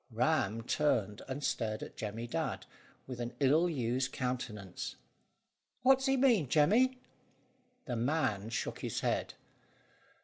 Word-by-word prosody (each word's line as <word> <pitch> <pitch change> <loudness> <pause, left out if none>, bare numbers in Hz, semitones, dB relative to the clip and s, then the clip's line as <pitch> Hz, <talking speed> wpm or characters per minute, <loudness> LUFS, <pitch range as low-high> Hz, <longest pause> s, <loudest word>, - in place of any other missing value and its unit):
Ram 115 -3 +1
turned, 115 -7 +1
and 135 +2 -4
stared 110 -4 -1
at - - -9
Jemmy 110 +2 -4
Dadd - - -2 0.4
with 125 -2 -7
an 120 0 -4
ill 150 +5 +4
used 130 -3 0
countenance. 120 -7 -4 0.9
"What 265 +1 +6
does 265 - -1
he 270 0 +3
mean, 235 - +4
Jemmy?" 225 - +4 0.9
The 120 -3 -2
man 120 -5 0
shook 115 - -3
his - - -3
head. - - -1
130 Hz, 130 wpm, -33 LUFS, 115-160 Hz, 0.9 s, What